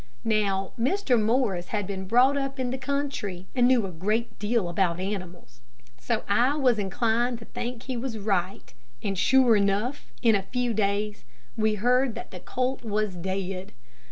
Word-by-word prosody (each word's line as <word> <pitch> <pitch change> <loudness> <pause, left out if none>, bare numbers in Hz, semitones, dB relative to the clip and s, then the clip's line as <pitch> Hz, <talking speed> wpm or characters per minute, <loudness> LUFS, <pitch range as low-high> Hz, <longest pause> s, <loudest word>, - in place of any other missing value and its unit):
Now, 200 -3 +1
Mr. 260 - +2
Morris 215 -6 +1
had 205 -2 -2
been 190 -1 -5
brought 250 +6 +5
up 275 -1 -2
in 250 -1 -1
the 260 - -2
country, 265 -10 -3
and 245 -2 +4
knew 250 -4 +4
a 190 - -5
great 210 +8 -2
deal 210 -2 +1
about 175 0 0
animals, 180 - -6 0.4
so 125 - -1
I 245 +8 +3
was 250 -6 +3
inclined 230 +4 0
to 225 - -12
think 240 +1 -5
he 260 - -4
was 240 -1 -3
right. 185 - -2 0.3
And 195 -1 -1
sure 250 +4 +5
enough, 205 +7 0
in 230 -2 +6
a 200 - +2
few 245 +4 -1
days, 205 0 -1 0.3
we 215 0 +1
heard 245 +3 +2
that - - -8
the 180 - -8
colt 255 +6 -2
was 210 -2 -1
dead. 190 +1 -4
215 Hz, 170 wpm, -26 LUFS, 195-250 Hz, 0.4 s, in